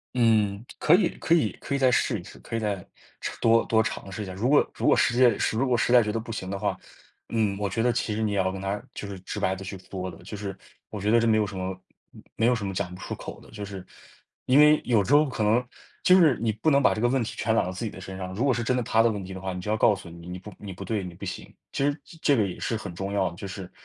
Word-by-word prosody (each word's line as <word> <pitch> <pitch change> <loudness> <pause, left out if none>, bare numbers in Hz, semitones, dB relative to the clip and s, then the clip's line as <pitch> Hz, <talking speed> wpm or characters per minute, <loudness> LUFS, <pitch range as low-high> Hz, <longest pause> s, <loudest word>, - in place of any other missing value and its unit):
嗯， 110 -3 +2
可 160 - +6
以 200 - +3
可 170 - +3
以 120 -11 +2
可 140 - -2
以 - - +2
再 130 -2 +4
试 115 -2 +1
一 - - -10
试， - - -13
可 115 - -6
以 - - 0
再 105 -2 -1 0.4
尝 - - -4
多 115 0 +5
多 110 -1 +3
尝 105 -3 -5
试 105 +3 -4
一 - - -6
下， 95 - -7
如 105 +7 -1
果 145 - +5
如 - - -2
果 - - +6
实在 125 +1 +5 0.3
如 130 +4 +1
果 125 -1 +2
实 120 - +1
在 125 - +8
觉 105 -2 -1
得 115 - -1
不 115 +1 -7
行 95 -4 -5
的 100 - -3
话， 100 +1 -1 0.5
嗯， 110 -4 +1
我 100 -1 -1
觉 115 +5 -1
得 125 0 +3
其 115 -3 -1
实 110 - -1
你 105 - 0
也 100 - -1
要 95 -1 +1
跟 95 - -6
他， 100 +2 -3
就 100 - -5
是 100 -2 -7
直 95 +3 -6
白 95 -2 +1
地 95 - -8
去 95 +1 -6
说 95 0 -6
的， - - -10
就 - - -7
是 100 -1 -5 0.3
我 105 - -6
觉 105 +2 0
得 115 - +6
这 115 - +2
没 110 -1 +4
有 110 - +2
什 100 -1 -7
么 95 0 -4 0.3
没 - - -13 0.2
没 115 - +2
有 125 - +4
什 110 -3 -4
么 95 - -3
讲 90 -1 -3
不 - - -12
出 - - -5
口 - - -8
的。 - - -17
就 105 -1 -7
是， 100 -2 -7 0.6
因 130 - +5
为 150 +1 +7
有 115 -5 +3
时 135 - +1
候 150 +1 +6
可 120 -4 -2
能， 110 +4 +3 0.4
就 185 - +7
是 155 -8 +5
你 115 -1 +1
不 110 +9 +1
能 140 0 +5
把 - - +4
这 - - -3
个 120 - +4
问 130 0 +1
题 110 - -6
全 110 - +1
揽 115 - +3
到 90 - -3
自 95 +5 -5
己 110 - -3
的 - - -10
身 95 0 -7
上， 95 -1 -5
如 110 +7 -1
果 140 - +4
是 120 0 -2
真 125 +2 +1
的 125 - +1
他 115 -1 +3
的 115 - +3
问 100 -2 -4
题 95 - -8
的 95 - -7
话， 95 0 -4
你 90 - -5
就 105 - -5
要 110 - +1
告 110 - +5
诉：” 95 -3 -10
你 85 0 -11
你 90 +1 -6
不 105 +3 -10
你 100 -2 -8
不 90 - -8
对， 110 -3 -2
你 90 -1 -7
不 - - -13
行。 - - -6 0.2
“其 - - -1
实 145 - +2
这 165 - -15
这 145 - +5
个 105 -5 +2
也 90 - -7
是 115 - -1
很 100 -5 -6
重 95 +3 -4
要 100 -2 +1
的， - - -11
就 100 +2 -7
是， 95 -1 -8
105 Hz, 355 characters per minute, -26 LUFS, 95-120 Hz, 0.6 s, 在